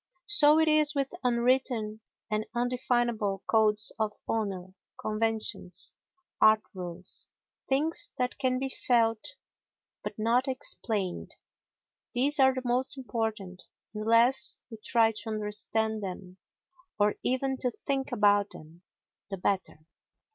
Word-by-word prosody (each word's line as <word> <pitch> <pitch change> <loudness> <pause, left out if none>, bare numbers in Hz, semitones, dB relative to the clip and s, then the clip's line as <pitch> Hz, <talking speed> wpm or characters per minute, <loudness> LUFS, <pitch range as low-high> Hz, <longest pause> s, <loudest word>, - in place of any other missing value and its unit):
So 310 -8 +7
it 320 0 +4
is 305 -1 +3
with 275 +1 -1
unwritten 240 -3 +1 0.3
and 215 0 -1
indefinable 240 -4 0
codes 215 -1 +3
of 215 -1 0
honour, 190 -4 -3 0.3
conventions, 215 -4 -1 0.5
art 215 0 +6
rules—things 190 - -3
that 250 0 -2
can 255 -1 +1
be 270 +1 -2 0.2
felt 230 -3 +2 0.7
but - - -6
not 235 +4 +1
explained—these 250 - -3
are 265 -1 +5
the 260 - -4
most 255 +3 +1
important, 215 -6 -4 0.3
and 215 - -5
the 220 - -3
less 235 +3 +4
we 225 - -8
try 225 +1 +2
to 220 +1 -6
understand 215 +1 -2
them, 185 -1 -7 0.6
or 205 0 +3
even 265 +1 -1
to 250 - 0
think 270 +3 -3
about 205 -3 +3
them, 160 +3 -14 0.5
the 195 - -4
better. 185 -4 -2
225 Hz, 120 wpm, -29 LUFS, 210-255 Hz, 0.7 s, So